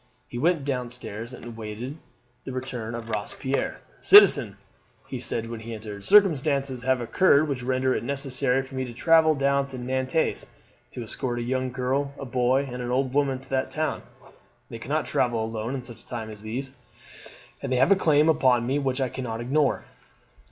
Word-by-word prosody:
He 120 Hz, -, -6 dB
went 165 Hz, 0 st, +1 dB
down 125 Hz, -3 st, -2 dB
stairs 120 Hz, -1 st, -6 dB
and 120 Hz, -2 st, -9 dB
waited 115 Hz, +5 st, -6 dB, 0.5 s
the -, -, -6 dB
return 125 Hz, -3 st, -5 dB
of 115 Hz, -1 st, -7 dB
Robespierre. 110 Hz, +5 st, -3 dB, 0.2 s
"Citizen," 140 Hz, -, +7 dB, 0.5 s
he -, -, -6 dB
said 115 Hz, 0 st, -2 dB
when 115 Hz, 0 st, -6 dB
he 115 Hz, +1 st, -7 dB
entered, 105 Hz, -2 st, -8 dB
"circumstances 140 Hz, -, +3 dB
have 130 Hz, 0 st, +1 dB
occurred 150 Hz, +4 st, +3 dB
which 135 Hz, -4 st, -3 dB
render 130 Hz, +1 st, +1 dB
it -, -, -2 dB
necessary 135 Hz, 0 st, 0 dB
for 135 Hz, +1 st, -14 dB
me 130 Hz, 0 st, -2 dB
to 120 Hz, -, -8 dB
travel 160 Hz, +4 st, +4 dB
down 140 Hz, 0 st, +1 dB
to 135 Hz, -1 st, -8 dB
Nantes 130 Hz, +4 st, -1 dB, 0.4 s
to 120 Hz, -, -7 dB
escort 120 Hz, +2 st, -4 dB
a 120 Hz, -, -2 dB
young 130 Hz, +1 st, -1 dB
girl, 135 Hz, +3 st, -1 dB
a -, -, -6 dB
boy, 125 Hz, +2 st, +1 dB
and 125 Hz, -2 st, -6 dB
an 120 Hz, -, -4 dB
old 130 Hz, +1 st, 0 dB
woman 140 Hz, -2 st, +1 dB
to 135 Hz, -, -15 dB
that 130 Hz, -1 st, 0 dB
town; 155 Hz, 0 st, -2 dB, 0.7 s
they -, -, -6 dB
cannot -, -, -1 dB
travel 115 Hz, -3 st, 0 dB
alone 115 Hz, +3 st, -4 dB
in 130 Hz, -, -5 dB
such 120 Hz, -3 st, -11 dB
times 110 Hz, -3 st, -5 dB
as 105 Hz, -1 st, -11 dB
these, 130 Hz, +5 st, -5 dB, 0.9 s
and 135 Hz, -, -4 dB
they 130 Hz, -, +2 dB
have 135 Hz, +9 st, +4 dB
a -, -, +8 dB
claim 155 Hz, -4 st, +3 dB
upon 130 Hz, -6 st, +3 dB
me 135 Hz, +4 st, 0 dB
which 135 Hz, -1 st, -1 dB
I 130 Hz, -, +1 dB
cannot 120 Hz, -4 st, -5 dB
ignore." 135 Hz, +4 st, +1 dB
130 Hz, 185 wpm, -25 LUFS, 120-140 Hz, 0.9 s, a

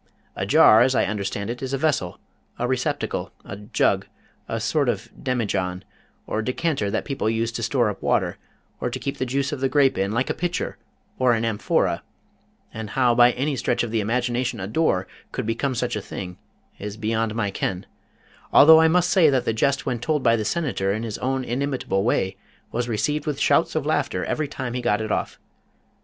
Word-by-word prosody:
A 95 Hz, -, -3 dB
jar, 125 Hz, -5 st, +7 dB
as 130 Hz, +1 st, +3 dB
I -, -, +3 dB
understand 100 Hz, +1 st, -3 dB
it, 120 Hz, -, -7 dB
is 135 Hz, 0 st, -4 dB
a -, -, +1 dB
vessel, 135 Hz, -, 0 dB, 0.4 s
a 125 Hz, -, -1 dB
receptacle, 130 Hz, 0 st, -2 dB
a 100 Hz, -, -6 dB
jug, 105 Hz, +1 st, 0 dB, 0.4 s
a -, -, -2 dB
sort -, -, +1 dB
of -, -, -3 dB
demijohn, 100 Hz, -7 st, -1 dB, 0.4 s
or 110 Hz, -, -2 dB
decanter 130 Hz, -2 st, -1 dB
that -, -, -2 dB
people 135 Hz, -6 st, -1 dB
use 115 Hz, +1 st, 0 dB
to 115 Hz, -, -5 dB
store 120 Hz, 0 st, +1 dB
up 105 Hz, -2 st, -4 dB
water, -, -, 0 dB, 0.4 s
or -, -, -1 dB
to -, -, -4 dB
keep 140 Hz, -, -4 dB
the 130 Hz, -, -1 dB
juice 140 Hz, +2 st, -1 dB
of 145 Hz, -, -4 dB
the 135 Hz, 0 st, +1 dB
grape 135 Hz, -8 st, +3 dB
in, 100 Hz, +1 st, 0 dB
like 125 Hz, +4 st, 0 dB
a -, -, 0 dB
pitcher, 175 Hz, 0 st, -3 dB, 0.4 s
or 125 Hz, -2 st, +4 dB
an 115 Hz, 0 st, 0 dB
amphora; 110 Hz, -2 st, 0 dB, 0.7 s
and 110 Hz, -1 st, -6 dB
how 125 Hz, -2 st, +4 dB
by 120 Hz, +1 st, +6 dB
any 140 Hz, +3 st, -1 dB
stretch 125 Hz, -, 0 dB
of 120 Hz, -, -4 dB
the 115 Hz, -, +1 dB
imagination 120 Hz, +2 st, -1 dB
a 95 Hz, -, -3 dB
door 100 Hz, -, +1 dB, 0.3 s
could -, -, -3 dB
become 120 Hz, +4 st, -1 dB
such 120 Hz, 0 st, -1 dB
a 105 Hz, -, -3 dB
thing 90 Hz, -2 st, -7 dB, 0.4 s
is 105 Hz, +1 st, -6 dB
beyond 110 Hz, 0 st, -1 dB
my 105 Hz, -4 st, -1 dB
ken, 95 Hz, -1 st, -3 dB, 0.7 s
although 160 Hz, +2 st, +8 dB
I 160 Hz, -, +5 dB
must 180 Hz, +2 st, +2 dB
say 170 Hz, -5 st, +6 dB
that 130 Hz, -3 st, +1 dB
the 115 Hz, -, +1 dB
jest 140 Hz, +5 st, +1 dB
when 125 Hz, -3 st, -1 dB
told 150 Hz, +4 st, -1 dB
by 115 Hz, -1 st, +5 dB
the 110 Hz, -, -1 dB
Senator 105 Hz, -, -1 dB
in 110 Hz, +3 st, -2 dB
his 110 Hz, -3 st, -5 dB
own 130 Hz, 0 st, -1 dB
inimitable 125 Hz, -7 st, -1 dB
way, 95 Hz, -4 st, 0 dB, 0.3 s
was 120 Hz, +1 st, -2 dB
received 145 Hz, +8 st, -1 dB
with 145 Hz, -2 st, -2 dB
shouts -, -, +2 dB
of -, -, 0 dB
laughter -, -, 0 dB
every 155 Hz, -1 st, -1 dB
time 130 Hz, -3 st, -5 dB
he 125 Hz, -, -2 dB
got 115 Hz, -3 st, +1 dB
it 110 Hz, -1 st, -3 dB
off. -, -, -2 dB
120 Hz, 205 wpm, -23 LUFS, 105-135 Hz, 0.7 s, although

